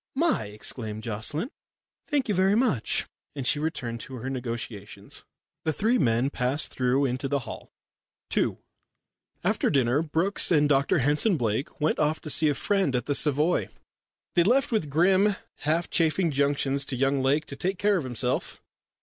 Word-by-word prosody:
"My!" 320 - +1
exclaimed 105 +1 -4
Miss 110 - -9
Jocelyn. 120 - -3 0.6
"Thank 290 -4 0
you 210 - +1
vurry 190 +2 +3
much," 225 - 0 0.3
and 135 -3 -4
she 145 - +3
returned 145 -7 -3
to 130 - -8
her 130 +2 -5
negotiations. 115 -5 -6 0.4
The 160 - 0
three 225 - +1
men 125 0 +2
passed 130 +4 0
through 130 +2 +1
into 130 +1 -2
the 140 0 0
hall. - - -9 0.7
II - - +1 0.9
After - - +1
dinner, 130 +1 +2
Brookes 165 +5 +1
and 150 -4 +4
Dr 140 -1 +2
Henson 150 - +3
Blake 115 +2 -2
went 155 +1 +1
off 155 +1 +1
to 155 - -1
see 155 +1 +4
a 145 - 0
friend 195 -9 +1
at 125 - -1
the 145 - 0
Savoy. 150 +4 +2 0.6
They 175 - +4
left 250 +8 +2
with 210 -10 0
grim 190 +7 +3 0.2
half 160 +3 0
chaffing 165 +1 +2
injunctions 140 0 +1
to 135 - -3
young 135 +1 +1
Lake 145 +4 +2
to 140 - -8
take 185 +6 -2
care 205 +1 +2
of 165 - -2
himself. 125 0 -2
145 Hz, 170 wpm, -26 LUFS, 125-175 Hz, 0.9 s, and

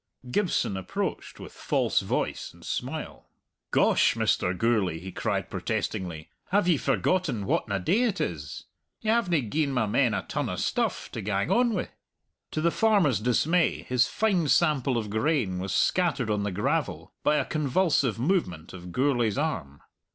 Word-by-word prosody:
Gibson 170 - 0
approached 95 - -4
with - - -9
false - - +1
voice - - -3
and - - -15
smile. - - -5 0.4
"Gosh, - - +3
Mr. 90 0 +1
Gourlay!" 105 -7 +1
he 95 +3 -8
cried - - -2
protestingly, 85 -4 -3 0.2
"have 195 -1 +2
ye 170 -4 +4
forgotten 135 - 0
whatna 100 +1 0
day 195 - +2
it 210 -5 -1
is? 75 -4 -4 0.4
Ye 220 - +1
havena 175 - +1
gi'en 150 +5 0
my 125 -4 +1
men 105 - +2
a - - -2
ton - - -2
o' - - -2
stuff - - -1
to - - -5
gang 100 0 -1
on 240 -2 +3
wi'." 180 - -2 0.6
To 155 - -3
the 170 +1 +3
farmer's 200 - +3
dismay 150 +9 +1
his 125 -1 +2
fine 195 -7 +1
sample 140 -5 +2
of 105 -3 -3
grain 110 - 0
was 95 +1 -4
scattered 140 - +1
on 105 -1 0
the 100 0 -2
gravel 95 +3 -2
by 150 - +3
a - - +1
convulsive 150 - +1
movement 120 - -1
of 90 -1 -9
Gourlay's 120 -3 +1
arm. 70 +1 -3
125 Hz, 160 wpm, -27 LUFS, -, 0.6 s, ye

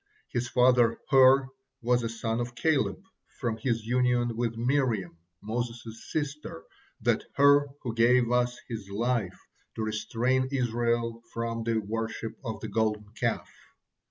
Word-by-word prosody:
His 120 0 -2
father 125 -2 +4
Hur 135 0 +6 0.3
was 125 +1 +3
a 115 - -2
son 115 0 -2
of 120 0 -4
Caleb 160 +6 +1 0.4
from 120 -5 -1
his 115 -1 -1
union 120 -1 +1
with 115 -1 -2
Miriam, 120 -8 0 0.3
Moses' 115 0 -5
sister, 150 - -4 0.4
that - - +1
Hur 145 +1 +6 0.2
who 120 -4 -3
gave 120 +2 +4 0.4
his 110 -4 -6
life 110 -2 -1 0.4
to 110 - -2
restrain 115 +4 0
Israel 120 -2 0
from 115 0 -3
the 115 0 0
worship 110 +1 -3
of 115 -3 -5
the - - -4
Golden 105 -2 -1
Calf. - - -1
120 Hz, 130 wpm, -28 LUFS, 115-125 Hz, 0.4 s, Hur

